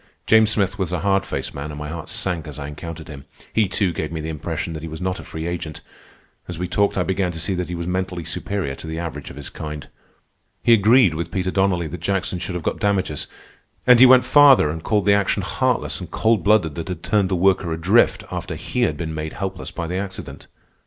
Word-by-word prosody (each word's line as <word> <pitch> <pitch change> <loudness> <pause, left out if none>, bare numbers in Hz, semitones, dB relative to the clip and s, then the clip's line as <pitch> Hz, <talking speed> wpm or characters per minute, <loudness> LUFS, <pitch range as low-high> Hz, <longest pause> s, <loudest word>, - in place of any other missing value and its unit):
James 110 -1 +5
Smith 100 -1 0
was 90 -3 -1
a 90 -3 -2
hard 95 0 +1
faced - - -4
man, 70 +2 -5
and 75 - -7
my 75 0 -5
heart 80 0 -6
sank 85 -4 -2
as 75 - -8
I 70 -1 -5
encountered 80 +2 -8
him. 70 -3 -10 0.3
He, 110 -2 +3
too, 95 -1 0
gave 80 -1 -3
me 80 - -4
the 80 +1 -4
impression 80 +3 -4
that 80 - -6
he 80 - -6
was 80 - -7
not 90 +1 -2
a - - -8
free 80 0 -6
agent, 85 -3 -4
and - - -35 0.6
as 90 - -5
we 90 +1 -2
talked 100 +3 +1
I 90 - +2
began 95 -1 0
to 80 - -6
see 95 - -1
that 90 -1 -3
he 90 - -3
was 85 0 -4
mentally 90 -1 -2
superior 95 -2 -3
to 80 - -8
the 80 0 -4
average 80 -4 -5
of - - -10
his 70 0 -7
kind. 75 -2 -7 0.7
He 120 - +6
agreed 110 -2 +5
with 85 +1 -4
Peter 95 +1 -1
Donnelly 95 -3 +1
that 80 +1 -7
Jackson 95 0 -1
should 90 0 -4
have 90 - -4
got - - -2
damages, 95 -8 0 0.6
and 125 -1 +7
he 130 - +10
went 130 0 +7
farther 140 - +6
and 80 +1 -5
called 105 -3 +1
the 100 - +5
action 100 -1 +1
heartless - - 0
and - - -8
cold 110 -1 +1
blooded 100 -7 +3
that 85 +3 -6
had 90 -3 -5
turned 100 -3 +2
the 95 - +1
worker 95 -1 +2
adrift 90 +8 +3
after - - -4
he - - -3
had 75 - +1
been 80 0 -4
made 80 0 -4
helpless 95 -2 -5
by 85 - -5
the 90 +3 -3
accident. 95 -1 -7
90 Hz, 245 wpm, -22 LUFS, 80-100 Hz, 0.7 s, he